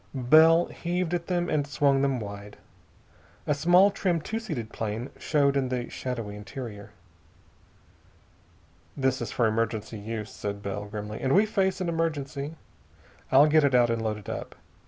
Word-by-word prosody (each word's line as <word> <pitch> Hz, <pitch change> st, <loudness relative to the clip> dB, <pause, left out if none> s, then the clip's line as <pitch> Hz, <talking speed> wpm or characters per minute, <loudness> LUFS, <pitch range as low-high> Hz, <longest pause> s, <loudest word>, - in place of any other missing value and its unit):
Bell 160 Hz, +6 st, +6 dB
heaved 175 Hz, 0 st, -3 dB
at 170 Hz, -1 st, -2 dB
them 175 Hz, -1 st, 0 dB
and 145 Hz, -2 st, 0 dB
swung 140 Hz, -1 st, +2 dB
them 135 Hz, -2 st, +1 dB
wide. 100 Hz, -1 st, -8 dB, 0.9 s
A 150 Hz, -, +2 dB
small, 175 Hz, +7 st, +5 dB
trim, 185 Hz, -4 st, 0 dB
two 220 Hz, +8 st, -4 dB
seated 150 Hz, -, -5 dB
plane 110 Hz, +3 st, -4 dB
showed 140 Hz, -2 st, +2 dB
in 135 Hz, -2 st, 0 dB
the 125 Hz, -1 st, -3 dB
shadowy 115 Hz, -5 st, -5 dB
interior. 105 Hz, 0 st, -8 dB, 2.1 s
"This 130 Hz, -1 st, 0 dB
is -, -, -4 dB
for 120 Hz, -, +1 dB
emergency 110 Hz, -1 st, -1 dB
use," 110 Hz, 0 st, -5 dB
said 100 Hz, 0 st, -5 dB
Bell 100 Hz, +1 st, -4 dB
grimly, 105 Hz, 0 st, -6 dB
"and 135 Hz, +3 st, +2 dB
we 205 Hz, +3 st, +5 dB
face 190 Hz, -3 st, 0 dB
an 180 Hz, -, -1 dB
emergency. 155 Hz, -3 st, -2 dB, 0.8 s
I'll 135 Hz, +3 st, +7 dB
get 155 Hz, 0 st, +4 dB
it 140 Hz, -2 st, +3 dB
out 120 Hz, -1 st, +4 dB
and 115 Hz, -1 st, -1 dB
load 110 Hz, -1 st, -2 dB
it 105 Hz, -, -13 dB
up. -, -, -6 dB
135 Hz, 160 wpm, -27 LUFS, 110-165 Hz, 2.1 s, I'll